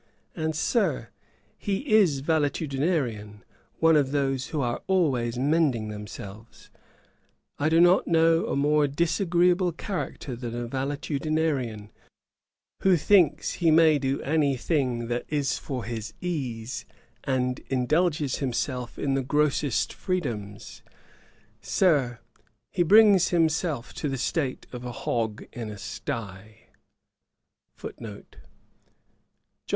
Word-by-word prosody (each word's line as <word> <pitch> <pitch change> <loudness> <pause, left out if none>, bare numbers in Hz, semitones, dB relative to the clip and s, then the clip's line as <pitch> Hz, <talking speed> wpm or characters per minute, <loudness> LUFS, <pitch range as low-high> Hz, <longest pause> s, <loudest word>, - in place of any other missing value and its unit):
And, 160 -1 -2
Sir, 215 +7 0 0.5
he 205 +7 -3
is 170 -11 +4
valetudinarian, 140 - -1 0.3
one 160 0 +4
of 145 -3 +3
those 135 -2 0
who 155 - -3
are 120 -3 -1
always 130 -11 +1
mending 135 -5 +1
themselves. 105 +1 -10 0.9
I 145 +2 +2
do 165 +1 +4
not 175 +2 +5
know 165 0 +3
a - - -1
more 145 +1 +3
disagreeable 175 +4 +2
character 165 - -5
than 120 -1 -6
a 120 0 -3
valetudinarian, 140 -4 -2 0.9
who 190 -2 +4
thinks 160 -3 +3
he 170 -2 +1
may 155 -1 +5
do 135 0 -1
any 145 -2 +1
thing 125 -4 -1
that 120 0 -1
is 145 -2 0
for 130 -4 -5
his 115 -1 -6
ease, 130 -9 -4 0.4
and 125 -1 -1
indulges 150 +2 +1
himself 125 -1 -3
in 140 -1 -1
the 135 - +1
grossest 145 0 0
freedoms: 115 - -4 0.8
Sir, 140 -10 +2 0.5
he - - 0
brings 200 0 +6
himself 160 -6 0
to 150 - -1
the 135 - -2
state 135 +1 -2
of 125 -1 -7
a 125 - -5
hog 110 -2 -3
in 115 -3 -5
a 105 - -7
stye.' 105 +1 -7
140 Hz, 115 wpm, -26 LUFS, 120-165 Hz, 0.9 s, brings